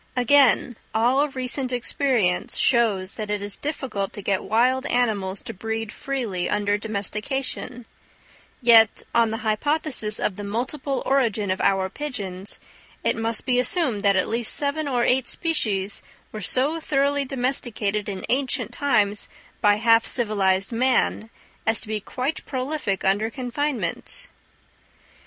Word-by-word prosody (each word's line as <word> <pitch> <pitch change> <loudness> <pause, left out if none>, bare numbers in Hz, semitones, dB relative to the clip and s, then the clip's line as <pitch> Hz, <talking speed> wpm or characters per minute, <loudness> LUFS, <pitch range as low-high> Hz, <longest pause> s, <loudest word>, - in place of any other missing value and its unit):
Again, 250 -2 +4 0.2
all 255 +6 +3
recent 260 0 -3
experience 245 -6 0
shows 210 -7 +2
that 215 -1 -4
it 210 0 -1
is 205 -1 +1
difficult 265 -9 -3
to 205 - -8
get 195 -1 0
wild 255 +4 +2
animals 205 -6 0
to 230 - -6
breed 225 +2 -4
freely 240 -12 -3
under 205 0 +1
domestication; 220 +4 -3 0.8
yet 225 -2 +6
on 230 -1 +4
the 225 - -3
hypothesis 230 -1 +1
of 190 - -1
the 205 - -6
multiple 260 +6 -2
origin 225 -7 +1
of 185 - -2
our 190 -1 +2
pigeons, 200 -7 -5 0.4
it - - +1
must 225 0 +1
be 250 -1 +2
assumed 255 - +1
that 200 -1 +3
at 185 - +1
least 230 0 0
seven 290 +1 -1
or 245 -3 +1
eight 250 0 +2
species 210 - 0 0.3
were 215 - -6
so 275 - +1
thoroughly 285 -2 +1
domesticated 240 -6 -1
in 190 -2 -5
ancient 265 0 0
times 210 -8 +1 0.3
by 205 -1 +5
half 230 +1 +4
civilized 195 -4 +1
man, 235 -2 +1 0.4
as 225 0 +3
to - - -6
be 215 0 -2
quite 260 +8 -4
prolific 260 -7 -2
under 205 +3 +2
confinement. 285 - -3
230 Hz, 140 wpm, -24 LUFS, 205-265 Hz, 0.8 s, yet